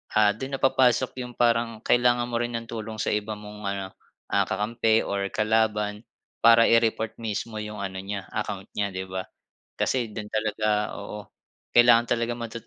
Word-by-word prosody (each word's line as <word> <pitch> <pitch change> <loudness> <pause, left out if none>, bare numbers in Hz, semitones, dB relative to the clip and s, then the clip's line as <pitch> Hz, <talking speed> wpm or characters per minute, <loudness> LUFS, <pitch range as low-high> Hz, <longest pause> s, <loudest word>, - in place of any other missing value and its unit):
ah, 105 -1 +5
dun 130 +6 -5
na - - -6
papasok 130 -1 +3
'yong 125 -1 -6
parang 115 -1 +1
kailangan 120 0 +3
mo 115 - 0
rin 120 0 -2
ng 115 - -3
tulong 110 -1 -6
sa 110 - -1
iba 105 +1 -2
mong 105 0 -10
ano, 100 -1 -3 0.4
ah, 100 -1 +2
kakampi 110 +2 +1
or 100 0 -2
kalaban 105 -1 +1 0.4
para 115 0 +7
i-report 115 -1 +2
mismo 110 0 -4
'yong 105 -1 -5
ano 95 -1 -4
niya, 100 +1 -5
account 105 -2 -4
niya 100 -1 -1
'di 95 -1 -6
ba. 95 0 -4 0.5
Kasi 120 -4 0
do'n 105 0 -6
talaga 110 0 -1
oo 105 +1 -7 0.5
kailangan 120 -1 +6
talaga 120 0 0
matut 115 -1 -7
110 Hz, 170 wpm, -26 LUFS, 105-115 Hz, 0.5 s, para